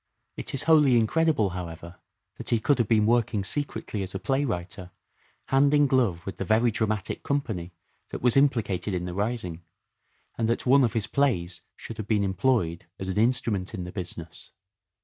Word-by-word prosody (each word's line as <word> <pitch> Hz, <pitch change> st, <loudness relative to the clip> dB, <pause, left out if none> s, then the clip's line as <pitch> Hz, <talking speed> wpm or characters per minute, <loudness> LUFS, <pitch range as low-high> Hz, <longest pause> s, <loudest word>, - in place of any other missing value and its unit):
It -, -, -6 dB
is 135 Hz, -, -1 dB
wholly 150 Hz, -6 st, +5 dB
incredible, 120 Hz, -, +2 dB
however, 85 Hz, -1 st, -7 dB, 0.4 s
that -, -, -6 dB
he 115 Hz, -, +3 dB
could 135 Hz, +4 st, +2 dB
have 115 Hz, -, +2 dB
been 105 Hz, -1 st, +3 dB
working 110 Hz, -3 st, +2 dB
secretly 110 Hz, -2 st, -3 dB
as 95 Hz, 0 st, -6 dB
a -, -, -2 dB
playwriter 95 Hz, -10 st, -2 dB, 0.6 s
hand 140 Hz, +2 st, +4 dB
in 145 Hz, 0 st, +5 dB
glove 120 Hz, -11 st, +1 dB
with 95 Hz, -, -6 dB
the -, -, -2 dB
very 110 Hz, +4 st, +3 dB
dramatic 110 Hz, -2 st, -2 dB
company 110 Hz, -12 st, -2 dB, 0.4 s
that -, -, -7 dB
was 125 Hz, -2 st, +4 dB
implicated 115 Hz, -9 st, +1 dB
in 90 Hz, 0 st, -3 dB
the 90 Hz, -, -5 dB
rising, 100 Hz, -4 st, -3 dB, 0.8 s
and 115 Hz, -1 st, +1 dB
that 115 Hz, -, -1 dB
one 135 Hz, +2 st, +5 dB
of 115 Hz, -, +1 dB
his 110 Hz, -3 st, 0 dB
plays 95 Hz, -12 st, 0 dB
should 115 Hz, -, -9 dB
have 110 Hz, -, -5 dB
been 105 Hz, -2 st, +2 dB
employed 95 Hz, -3 st, 0 dB
as 95 Hz, -1 st, -5 dB
an 95 Hz, -, -1 dB
instrument 110 Hz, -4 st, +1 dB
in 90 Hz, -, -4 dB
the 90 Hz, -, -7 dB
business. 85 Hz, -3 st, -6 dB
110 Hz, 180 wpm, -26 LUFS, 90-130 Hz, 0.8 s, wholly